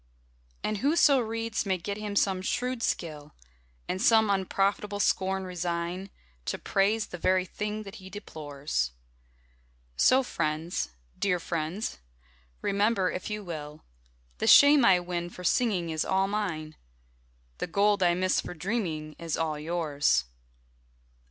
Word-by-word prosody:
And 215 Hz, -1 st, -1 dB
whoso 285 Hz, 0 st, +4 dB
reads 225 Hz, -1 st, -2 dB
may 190 Hz, -2 st, 0 dB
get 200 Hz, +4 st, -4 dB
him 210 Hz, -1 st, -5 dB
some 190 Hz, -2 st, +2 dB
shrewd 250 Hz, +5 st, -2 dB
skill; 155 Hz, -7 st, -3 dB, 0.5 s
And 185 Hz, -, -2 dB
some 220 Hz, -2 st, +5 dB
unprofitable 200 Hz, +1 st, 0 dB
scorn 190 Hz, -1 st, +1 dB
resign, 180 Hz, +1 st, -3 dB, 0.4 s
To -, -, -2 dB
praise 205 Hz, +2 st, +1 dB
the 175 Hz, -, -9 dB
very 185 Hz, +1 st, +2 dB
thing 210 Hz, +3 st, -4 dB
that 195 Hz, +1 st, -9 dB
he 190 Hz, -2 st, -11 dB
deplores; 145 Hz, -, -4 dB, 1.0 s
So, 260 Hz, -, +5 dB
friends 155 Hz, -, -2 dB, 0.3 s
(dear 180 Hz, -3 st, +1 dB
friends), 165 Hz, -, -3 dB, 0.6 s
remember, 200 Hz, -1 st, +2 dB
if 180 Hz, -, -5 dB
you 210 Hz, 0 st, -4 dB
will, 155 Hz, -4 st, -7 dB, 0.6 s
The -, -, 0 dB
shame 285 Hz, -1 st, +8 dB
I 185 Hz, -4 st, +6 dB
win 175 Hz, -1 st, -4 dB
for 180 Hz, -, -10 dB
singing 180 Hz, -4 st, +1 dB
is 155 Hz, -1 st, 0 dB
all 190 Hz, 0 st, +1 dB
mine, 170 Hz, -7 st, -3 dB, 0.8 s
The -, -, -2 dB
gold 200 Hz, +3 st, +2 dB
I 175 Hz, -1 st, +4 dB
miss 185 Hz, +1 st, +1 dB
for -, -, -7 dB
dreaming 160 Hz, -5 st, -3 dB
is 165 Hz, -2 st, -2 dB
all 155 Hz, -2 st, -1 dB
yours. 150 Hz, -, +1 dB
185 Hz, 135 wpm, -28 LUFS, 165-210 Hz, 1.0 s, shame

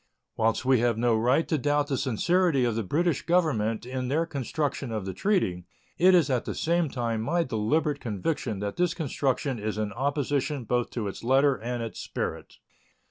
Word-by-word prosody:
Whilst 115 Hz, +2 st, +1 dB
we 130 Hz, -2 st, +4 dB
have 120 Hz, -1 st, +1 dB
no 120 Hz, 0 st, +2 dB
right 125 Hz, +8 st, +2 dB
to 155 Hz, -, 0 dB
doubt 145 Hz, +2 st, +1 dB
the 145 Hz, -2 st, -2 dB
sincerity 145 Hz, -, +2 dB
of 120 Hz, -, +1 dB
the 115 Hz, -, -1 dB
British 155 Hz, -, 0 dB
Government 120 Hz, -12 st, +1 dB
in 130 Hz, 0 st, -3 dB
their 155 Hz, +6 st, +1 dB
construction 140 Hz, -3 st, -3 dB
of 110 Hz, -4 st, -3 dB
the 95 Hz, -, -4 dB
treaty, 90 Hz, -, 0 dB, 0.3 s
it 185 Hz, +1 st, +6 dB
is 170 Hz, -6 st, +4 dB
at 130 Hz, -4 st, 0 dB
the -, -, -4 dB
same 170 Hz, -1 st, +1 dB
time 115 Hz, -4 st, -2 dB
my 170 Hz, +9 st, +1 dB
deliberate 140 Hz, +4 st, 0 dB
conviction 110 Hz, -, -3 dB
that 100 Hz, 0 st, -4 dB
this 175 Hz, -1 st, +1 dB
construction 135 Hz, -4 st, -1 dB
is 105 Hz, 0 st, -3 dB
in 105 Hz, -2 st, -2 dB
opposition 140 Hz, +1 st, -1 dB
both 120 Hz, +1 st, 0 dB
to 115 Hz, -4 st, -3 dB
its 100 Hz, -, -7 dB
letter 135 Hz, +3 st, +4 dB
and 120 Hz, 0 st, -4 dB
its 115 Hz, -, -6 dB
spirit. -, -, -5 dB
130 Hz, 190 wpm, -27 LUFS, 115-150 Hz, 0.3 s, it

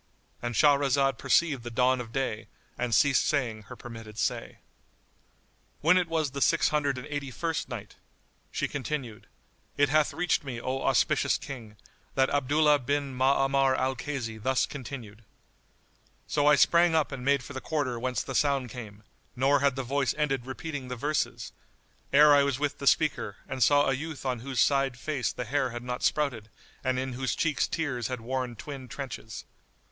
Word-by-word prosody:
——And 120 Hz, -1 st, -3 dB
Shahrazad 140 Hz, 0 st, +3 dB
perceived 140 Hz, 0 st, +2 dB
the 120 Hz, -, -6 dB
dawn 125 Hz, +2 st, +2 dB
of 115 Hz, -2 st, -9 dB
day 115 Hz, -4 st, -2 dB, 0.3 s
and 120 Hz, -3 st, 0 dB
ceased 140 Hz, +4 st, +4 dB
saying 115 Hz, -7 st, -1 dB
her -, -, -8 dB
permitted 115 Hz, -3 st, -10 dB
say. -, -, -2 dB, 1.2 s
When 165 Hz, +5 st, +5 dB
it 180 Hz, -2 st, +2 dB
was 160 Hz, -4 st, -1 dB
the 140 Hz, +1 st, -5 dB
Six -, -, +3 dB
Hundred 145 Hz, -3 st, 0 dB
and 125 Hz, -, -6 dB
Eighty 145 Hz, -2 st, -4 dB
first 165 Hz, +3 st, -3 dB
Night, -, -, -8 dB, 0.5 s
She -, -, -1 dB
continued, 130 Hz, -4 st, -5 dB, 0.5 s
It 145 Hz, -1 st, +4 dB
hath 155 Hz, +1 st, +3 dB
reached 180 Hz, -4 st, 0 dB
me, 130 Hz, -4 st, -5 dB
O 130 Hz, +2 st, -3 dB
auspicious -, -, +2 dB
King, 115 Hz, -6 st, -9 dB, 0.4 s
that 135 Hz, 0 st, +3 dB
Abdullah 145 Hz, +2 st, +3 dB
bin 140 Hz, 0 st, -2 dB
Ma'amar 135 Hz, 0 st, +3 dB
al 130 Hz, +1 st, 0 dB
Kaysi 115 Hz, -5 st, -5 dB
thus 130 Hz, +3 st, +2 dB
continued:—So 125 Hz, +3 st, -7 dB
I 150 Hz, -, +7 dB
sprang 170 Hz, +3 st, +4 dB
up 155 Hz, -2 st, +2 dB
and 135 Hz, -2 st, -6 dB
made 140 Hz, 0 st, +2 dB
for 145 Hz, -, -9 dB
the 130 Hz, -, -5 dB
quarter 140 Hz, -6 st, -2 dB
whence 125 Hz, +1 st, -1 dB
the 135 Hz, -, -6 dB
sound 135 Hz, -2 st, +1 dB
came, 110 Hz, -4 st, -9 dB, 0.3 s
nor 135 Hz, +3 st, +3 dB
had 140 Hz, -1 st, +2 dB
the 135 Hz, -, -3 dB
voice 135 Hz, 0 st, 0 dB
ended 135 Hz, -5 st, -1 dB
repeating 140 Hz, 0 st, -5 dB
the 125 Hz, -, -4 dB
verses, 145 Hz, +5 st, -2 dB, 0.6 s
ere 150 Hz, +1 st, +7 dB
I 145 Hz, -, +6 dB
was 140 Hz, -2 st, +1 dB
with 145 Hz, 0 st, -2 dB
the 140 Hz, -, -3 dB
speaker 140 Hz, -11 st, +2 dB
and 130 Hz, -, -5 dB
saw 145 Hz, +4 st, +5 dB
a 135 Hz, -, +2 dB
youth 150 Hz, +1 st, -5 dB
on 125 Hz, -2 st, -1 dB
whose 130 Hz, +1 st, -1 dB
side 135 Hz, -3 st, +2 dB
face 135 Hz, -5 st, -2 dB
the 125 Hz, -, -5 dB
hair 130 Hz, +2 st, 0 dB
had 120 Hz, 0 st, -6 dB
not 125 Hz, 0 st, -4 dB
sprouted 130 Hz, -8 st, 0 dB, 0.3 s
and 130 Hz, -1 st, 0 dB
in 130 Hz, 0 st, -2 dB
whose 130 Hz, +1 st, -2 dB
cheeks 155 Hz, -4 st, +1 dB
tears 130 Hz, -8 st, -2 dB
had 125 Hz, -1 st, -4 dB
worn 125 Hz, +1 st, -3 dB
twin 135 Hz, +3 st, -8 dB
trenches. 115 Hz, -5 st, -7 dB
135 Hz, 175 wpm, -28 LUFS, 125-145 Hz, 1.2 s, I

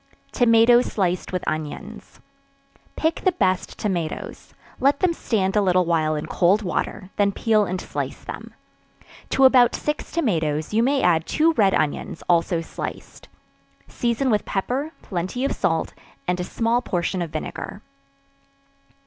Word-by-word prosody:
Tomatoes 240 Hz, +1 st, +5 dB
sliced 185 Hz, -3 st, -1 dB
with 185 Hz, -1 st, -2 dB
Onions. 155 Hz, +8 st, -5 dB, 0.8 s
Pick 320 Hz, +1 st, 0 dB
the 370 Hz, -, +3 dB
best 185 Hz, -, 0 dB
tomatoes; 175 Hz, -6 st, -4 dB, 0.2 s
let 280 Hz, +2 st, +3 dB
them 360 Hz, -2 st, +2 dB
stand 195 Hz, -10 st, -1 dB
a 210 Hz, -, +4 dB
little 185 Hz, -2 st, +3 dB
while 160 Hz, -2 st, +1 dB
in 150 Hz, -, -3 dB
cold 195 Hz, +5 st, +2 dB
water, 185 Hz, 0 st, -3 dB
then 200 Hz, -1 st, +3 dB
peel 215 Hz, 0 st, +2 dB
and 185 Hz, 0 st, -3 dB
slice -, -, -5 dB
them. -, -, -8 dB, 0.7 s
To 270 Hz, -, +4 dB
about 250 Hz, -2 st, +6 dB
six 300 Hz, 0 st, -3 dB
tomatoes, 160 Hz, -, -1 dB
you 225 Hz, -, +3 dB
may 270 Hz, +3 st, +2 dB
add 165 Hz, -2 st, +3 dB
two 325 Hz, +1 st, +3 dB
red 200 Hz, -8 st, +3 dB
onions, 155 Hz, +2 st, -2 dB
also 170 Hz, 0 st, +2 dB
sliced; 165 Hz, -, -8 dB, 0.6 s
season 240 Hz, +2 st, 0 dB
with 210 Hz, -1 st, +2 dB
pepper, 255 Hz, +10 st, -2 dB
plenty 190 Hz, +8 st, -3 dB
of 275 Hz, -, 0 dB
salt, 165 Hz, -1 st, -1 dB, 0.3 s
and 180 Hz, 0 st, 0 dB
a -, -, -1 dB
small 230 Hz, +5 st, 0 dB
portion 180 Hz, -4 st, -2 dB
of 170 Hz, -, -3 dB
vinegar. 155 Hz, +6 st, -6 dB
200 Hz, 145 wpm, -23 LUFS, 175-245 Hz, 0.8 s, about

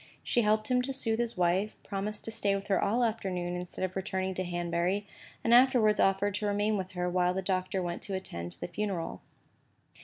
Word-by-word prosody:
She 240 Hz, -, +2 dB
helped 215 Hz, +1 st, +1 dB
him 250 Hz, 0 st, +4 dB
to 270 Hz, +2 st, -3 dB
soothe 225 Hz, -4 st, 0 dB
his 235 Hz, -3 st, -1 dB
wife, 180 Hz, +4 st, +1 dB
promised 205 Hz, +2 st, -4 dB
to 225 Hz, -, -3 dB
stay 200 Hz, -2 st, +1 dB
with 200 Hz, +1 st, -5 dB
her 195 Hz, -, +3 dB
all 230 Hz, +5 st, +2 dB
the -, -, +4 dB
afternoon 185 Hz, -6 st, -2 dB
instead 180 Hz, +1 st, -3 dB
of 185 Hz, -, -6 dB
returning 190 Hz, -1 st, -2 dB
to 185 Hz, -, -2 dB
Hanbury, 175 Hz, +3 st, -1 dB, 0.4 s
and 230 Hz, -, +3 dB
afterwards 245 Hz, -4 st, +5 dB
offered 195 Hz, +1 st, +3 dB
to 210 Hz, -, -1 dB
remain 205 Hz, +1 st, +1 dB
with 185 Hz, -2 st, -4 dB
her 180 Hz, 0 st, -1 dB
while 180 Hz, 0 st, +2 dB
the 190 Hz, -, -1 dB
Doctor 185 Hz, 0 st, -1 dB
went 175 Hz, 0 st, -3 dB
to 195 Hz, -, -3 dB
attend 85 Hz, -, -4 dB
the -, -, -5 dB
funeral. 185 Hz, -2 st, -3 dB
195 Hz, 210 wpm, -30 LUFS, 180-215 Hz, 0.4 s, afterwards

